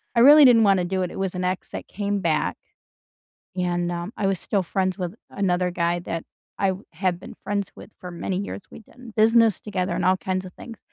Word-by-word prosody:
I 235 - +5
really 290 +3 +9
didn't 235 -3 +7
wanna 195 -3 +3
do 185 +1 -1
it, 180 - -3
it - - -7
was 190 -1 -2
an 180 - -2
ex 185 0 -2
that - - -6
came 205 0 -2
back 165 -4 0 1.0
and, 175 -1 -1
um, 175 +4 -5
I 200 - -1
was 195 -2 0
still 200 -2 0
friends 185 +2 -1
with 180 0 -4 0.2
another 180 -2 0
guy 175 0 0
that 165 -1 -5 0.3
I 195 -1 +2 0.2
have 175 +1 -1
been - - -10
friends 200 -1 -2
with - - -12
for 180 - -7
many 180 +2 -3
years, 200 +1 -5
we've 220 - -12
done 245 0 -14
business 225 -1 +4
together 195 -3 -2
and - - -1
all 185 +1 +4
kinds 185 0 -3
of 185 - -9
things. 230 -3 -10
190 Hz, 220 wpm, -24 LUFS, 180-205 Hz, 1.0 s, really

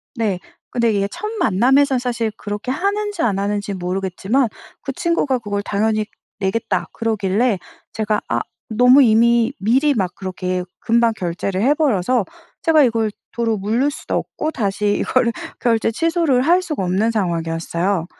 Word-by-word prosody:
네. 215 -6 -1 0.3
근데 235 -2 +2
이게 200 -1 +1
첫 425 - -5
만남에서 265 +7 +3
사실 240 -3 -1
그렇게 205 +3 -5
하는지 410 +7 -1
안 200 -4 +1
하는지 205 0 -2
모르겠지만 190 +7 -1 0.3
그 275 - -4
친구가 280 -3 0
그걸 205 -3 -3
당연히 215 +1 0 0.3
내겠다 200 +3 -1
그러길래 220 0 0 0.4
제가 215 -1 0
아 115 0 0 0.3
너무 250 +5 +6
이미 235 0 +4
미리 265 +9 +3
막 190 -5 -1
그렇게 185 -1 -3 0.2
금방 230 0 +2
결제를 185 +1 -2
해버려서 255 - +2 0.4
제가 315 -3 +5
이걸 225 -3 +1 0.2
도로 230 -2 0
무를 225 +8 +1
수도 290 - -5
없고 310 - -2
다시 205 -4 0
이걸 250 -2 +2 0.3
결제 230 -2 +2
취소를 325 -1 +1
할 345 +5 +4
수가 310 - -3
없는 190 +5 +1
상황이었어요. 170 -2 -1
225 Hz, 320 characters per minute, -20 LUFS, 195-255 Hz, 0.4 s, 너무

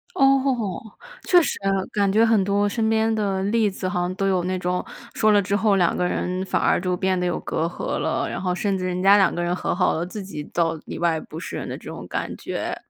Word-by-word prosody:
哦， 270 -8 +2 0.5
确 355 -1 +6
实， - - -2 0.3
感 200 -2 +1
觉 220 +3 +4
很 225 -3 +3
多 200 +1 +1
身 220 +1 0
边 225 0 +2
的 200 -3 -1
例 215 +1 +2
子 190 -1 -7
好 180 - -1
像 180 +1 -2
都 195 0 0
有 185 -2 +1
那 185 0 -1
种， 180 0 -1 0.3
说 215 -1 +3
了 205 - +5
之 200 +1 0
后 210 -1 +3
两 175 -3 +2
个 180 - 0
人 185 +1 -2
反 - - 0
而 - - +3
就 180 0 -1
变 190 0 0
得 180 - -1
有 175 - 0
隔 160 - -2
阂 170 - -3
了。 - - -1
然 - - -4
后 180 -1 -1
甚 195 0 0
至 185 - -3
人 180 0 -2
家 200 +1 +7
两 195 -3 +3
个 175 - -2
人 175 +1 0
和 180 - -2
好 180 - +2
了， 165 - -2
自 195 +2 -7
己 185 -6 -7
倒 165 -1 +1
里 - - -6
外 170 -2 +1
不 155 - -10
是 170 - -6
人 - - -5
的 - - -5
这 - - -9
种 - - -8
感 - - -3
觉。 - - -4
190 Hz, 275 characters per minute, -23 LUFS, 180-210 Hz, 0.5 s, 家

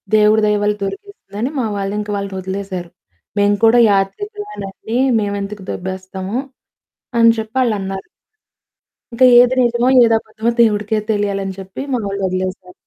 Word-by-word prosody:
దేవుడి 215 +1 +4
దయ 210 0 +2
వల్ల 210 0 +2
దొరికేసింది" 400 - -8
అని 250 - 0
మా 235 - 0
వాళ్లు 200 0 -3
ఇంక 210 0 -5
వాళ్లని 200 -1 -4
వొదిలేసారు. 190 -2 -5 0.5
"మేము 205 0 +3
కూడా 235 +2 +6
యాత్రికులమెనండి. 225 - -3 0.2
మేమెందుకు 200 -1 -4
దొబ్బేస్తాము?" 190 +3 -5 0.8
అని 230 0 +7
చెప్పి 220 +4 -5
ఆళ్లు 230 -3 +1
అన్నారు. 195 - -5 1.1
ఇంకా 255 +2 +4 0.2
ఏది 250 +1 +3
నిజమో, 240 +1 +2
ఏది 230 -1 +4
అబద్ధమో 220 +1 -3
దేవుడికే 215 -1 +2
తెలియాలి 205 -1 -1
అని 190 -1 -5
చెప్పి 190 +5 -8
మా 245 - +1
వాళ్లు 200 0 -4
వొదిలేసారు. 185 0 -4
205 Hz, 145 wpm, -18 LUFS, 195-230 Hz, 1.1 s, అని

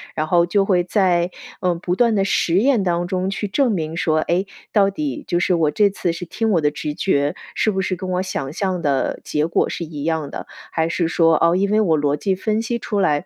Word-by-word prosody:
然 155 0 -1
后 170 0 +4
就 195 +3 +2
会 180 -3 +2
在， 180 -2 +1 0.3
嗯， 175 -2 0
不 180 0 -1
断 235 0 +3
的 195 -2 +2
实 175 -3 +1
验 240 -2 +3
当 175 -1 0
中 185 0 -1
去 200 +1 -3
证 250 +4 +1
明 165 -3 -3
说， 155 -2 +1
哎， 175 +5 0 0.3
到 200 -2 +3
底， 295 +5 -4
就 175 - +1
是 180 0 +2
我 155 -3 +2
这 205 +5 +3
次 180 -3 -2
是 175 +1 -6
听 220 +5 -1
我 170 -4 +3
的 150 - +3
直 150 0 -4
觉， 145 -4 0 0.2
是 215 - +2
不 190 -1 -1
是 185 -1 -1
跟 185 +1 -6
我 180 +1 0
想 150 -7 -4
象 185 -1 -1
的 140 -4 0
结 150 +1 -1
果 170 - +1
是 170 - -4
一 150 -3 -6
样 160 -3 -1
的。 - - -7 0.3
还 160 0 0
是 165 0 0
说 165 -1 +3
哦， 170 +1 +4
因 200 +2 +1
为 215 +1 +4
我 165 -6 +2
逻 145 0 +1
辑 190 +5 -1
分 215 +3 -1
析 235 +1 -2
出 210 -3 -3
来， 150 -2 +1
180 Hz, 265 characters per minute, -20 LUFS, 160-195 Hz, 0.3 s, 后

